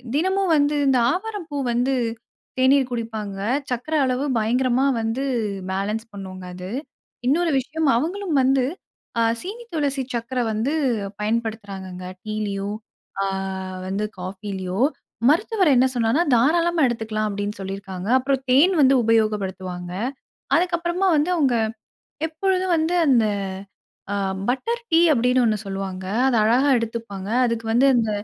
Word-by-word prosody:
தினமும் 375 +3 +1
வந்து, 290 +1 +2
இந்த 265 -1 +4
ஆவாரம் 410 +1 -3
பூ 290 - -3 0.2
வந்து, 250 +3 +1 0.7
தேநீர் 265 0 +4
குடிப்பாங்க. 220 -4 -4 0.3
சர்க்கரை 250 +6 -1
அளவு 255 +1 0 0.2
பயங்கரமா 250 +4 +2 0.2
வந்து 225 +4 -1 0.5
பேலன்ஸ் 210 +4 -2
பண்ணுங்க 190 -2 -8
அது. 180 0 -7 0.6
இன்னொரு 330 +5 +2
விஷயம், 305 +4 -2
அவங்களும் 345 +5 -2
வந்து 265 0 +3 0.5
அ - - +3 0.2
சீனி 440 +6 -7
துளசி 285 -4 0
சர்க்கரை 240 +1 -1
வந்து, 225 +7 -1 0.5
பயன்படுத்துறாங்கங்க 205 -5 -3 0.2
டீலயும், 205 -1 -3 0.5
அ - - +1 0.6
வந்து 200 +3 -1
காஃபிலயோ. 190 0 -5 0.5
மருத்துவர் 375 +1 +3
என்ன 250 - +5
சொன்னார்னா? 235 +7 +2
"தாராளமா 335 +7 +3
எடுத்துக்கலாம்" 220 -2 -2
அப்டின்னு 205 +1 -4
சொல்லிருக்காங்க. 195 -1 -6
அப்புறம் 270 0 0
தேன் 305 +9 +5
வந்து 270 0 +6
உபயோகப்படுத்துவாங்க. 190 -5 0 0.6
அதுக்குகப்பறமா 345 +2 +1
வந்து, 300 +4 +1
அவங்க 275 -7 +2 0.7
எப்பொழுதும் 370 +2 0
வந்து, 320 +2 0
அந்த 240 -5 +5 0.9
அ - - 0 0.3
பட்டர் 460 - -1
டீ 325 - +6
அப்டின்னு 250 0 +3
ஒன்னு 215 -1 +1
சொல்லுவாங்க. 195 -1 -4 0.2
அத 250 - +2
அழகா 250 +6 +3
எடுத்துப்பாங்க. 225 -4 -5 0.2
அதுக்கு 230 -1 -2
வந்து 245 +4 +4
அந்த 225 -2 +1
240 Hz, 125 wpm, -23 LUFS, 210-300 Hz, 0.9 s, வந்து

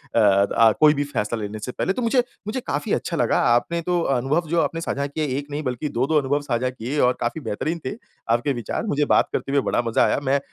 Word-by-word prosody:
The 105 +1 +4
कोई 150 -1 +7
भी 145 - -1
फ़ैसला 115 -5 -2
लेने 105 +1 -5
से 125 +4 -5
पहले, 190 +9 -1
तो 250 - -3
मुझे 240 +1 +2 0.2
मुझे 250 +5 -2
काफ़ी 220 - -1
अच्छा 170 - -2
लगा - - +2
आपने 170 +8 0
तो 175 0 0 0.2
अनुभव 150 +7 0
जो 170 -1 +2
आपने 165 +3 -2
साझा 140 -3 -2
किए 155 +2 -2
एक 145 0 -5
नहीं 150 +2 -3
बल्कि 125 +4 -3
दो-दो 150 +4 +3
अनुभव 145 +1 0
साझा 125 +2 +1
किए 130 +4 -4
और 125 0 +4
काफ़ी 120 +7 -2
बेहतरीन 155 +8 -3
थे 130 - -3 0.3
आपके 120 +5 +2
विचार 120 - -4
मुझे 150 -6 +1
बात - - +3
करके - - -2
भी 140 - +3
बड़ा - - +2
मज़ा 115 - +3
आया। - - +1
मैं 140 +1 +2
140 Hz, 235 wpm, -23 LUFS, 120-160 Hz, 0.3 s, कोई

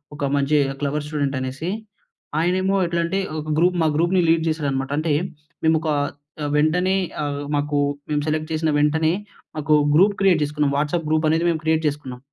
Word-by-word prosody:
ఒక 145 - -2
మంచి 140 +2 +2 0.2
clever 145 +1 -2
student 145 -2 -1
అనేసి, 130 +6 -4 0.7
ఆయనేమో 185 +3 +1
ఎట్లాంటే 170 +2 -1 0.2
ఒక 155 0 -6
గ్రూప్ 180 +2 +3
మా 160 - +3
గ్రూప్‌ని 175 +3 +2
లీడ్ 165 0 +3
చేసాడన్నమాట. 140 -4 -1
అంటే 155 -1 0 0.5
మేము 160 0 +4
ఒక 160 - -2 0.5
ఆహ్, 145 - -1
వెంటనే 180 +5 +2 0.3
ఆహ్, 145 -1 -3 0.2
మాకు 145 0 -1 0.3
మేము 150 -1 +1
సెలక్ట్ 155 +1 -2
చేసిన 160 0 0
వెంటనే 155 +2 +2 0.4
మాకు 155 0 +1 0.2
గ్రూప్ 200 +5 +5
క్రియేట్ 185 -5 +4
చేసుకున్నాం. 150 -1 0
వాట్సాప్ 155 +2 -1
గ్రూప్ 155 0 +2
అనేది 165 +2 +1
మేము 160 -2 -3
క్రియేట్ 160 0 +2
చేసుకున్నాం. 140 -4 -4
155 Hz, 165 wpm, -22 LUFS, 145-170 Hz, 0.7 s, గ్రూప్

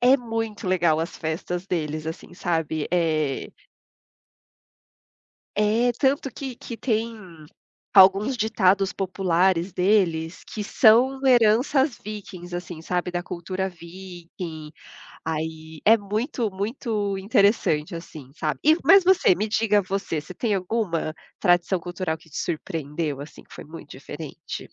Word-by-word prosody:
É 255 +2 +6
muito 225 -5 -4
legal 170 -4 +2
as 165 +2 -4
festas 175 +3 -4
deles, 155 -3 -3
assim, 160 +2 -7
sabe? 160 -3 -1
É 155 -5 0 2.1
é, 220 +4 +2
tanto 270 +2 +1
que 265 -3 -6
que 235 0 -8
tem 230 -1 -1 0.8
alguns 195 +6 +6
ditados 200 -3 +2
populares 185 -1 +1
deles 180 -3 +1
que 210 - -6
são 250 +5 +4
heranças 250 +3 +4
vikings, 190 -4 -8
assim, 175 -2 -6
sabe, 180 +1 -2
da 175 0 -2
cultura 185 +2 -3
viking, 170 -3 -9 0.5
aí 160 0 -5
é 225 +2 +7
muito 215 +2 -2
muito 205 0 -2
interessante, 200 - +2
assim, 155 -5 -9
sabe? 155 -1 -2
E 310 +2 +6
mas 390 -2 +7
você, 370 - +5
me 210 - -1
diga 215 -1 +2
você, 190 -4 -3
você 155 +5 -11
tem 215 -1 0
alguma 180 -5 -1 0.2
tradição 175 +1 +2
cultural 175 -1 -4
que 160 0 -21
te - - -6
surpreendeu, 155 -3 -3
assim, 145 - -10
que - - -16
foi - - -9
muito 160 -1 -11
diferente? 145 +2 -8
185 Hz, 130 wpm, -24 LUFS, 165-220 Hz, 2.1 s, é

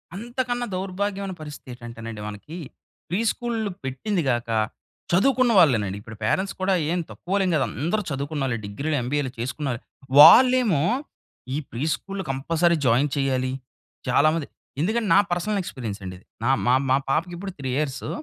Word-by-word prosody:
అంతకన్నా 245 +3 -2
దౌర్భాగ్యమైన 195 +1 -3
పరిస్థితి 150 -3 -9
ఏంటంటేనండి 115 -2 -8
మనకి. 105 - -8 0.5
ప్రీ 180 - 0
స్కూళ్లు 230 -3 -3
పెట్టింది 155 +9 -1
కాక 120 -1 -1 0.6
చదువుకున్న 255 +7 +4
వాళ్ళేనండి. 110 - +3
ఇప్పుడు 110 0 -11
పేరెంట్స్ 190 - 0
కూడా 190 +1 +2 0.2
ఏం 180 - +1
తక్కువాళ్లేం 190 0 -1
కాదు. 140 -4 +2 0.2
అందరూ 175 +8 +1
చదువుకున్నోళ్ళే 140 -3 -2
డిగ్రీలు, 140 +10 -2
ఎంబీఏలు 135 +1 -1
చేసుకున్నారే. 125 +1 -3 0.4
వాళ్ళేమో 250 - +8 0.7
ఈ - - 0
ప్రీ 120 +4 -4
స్కూల్లో 195 +3 -5
కంపల్సరీ 165 +5 +2
జాయిన్ 130 +4 +3
చెయ్యాలి. 130 -2 0 0.6
చాలా 140 +4 +4
మంది 160 -3 -2 0.3
ఎందుకంటే 220 +6 0
నా - - +7
పర్సనల్ 190 +4 0
ఎక్స్పీరియన్స్ 115 - -6
అండి 95 -1 -6
ఇది. 90 - -21 0.2
నా 120 - +2 0.2
మా, 125 - +4 0.2
మా 130 - +5
పాపకి 170 +6 0
ఇప్పుడు 195 +2 -5
3 135 -2 -4
ఇయర్సు. 145 -2 -2
150 Hz, 145 wpm, -24 LUFS, 130-195 Hz, 0.7 s, వాళ్ళేమో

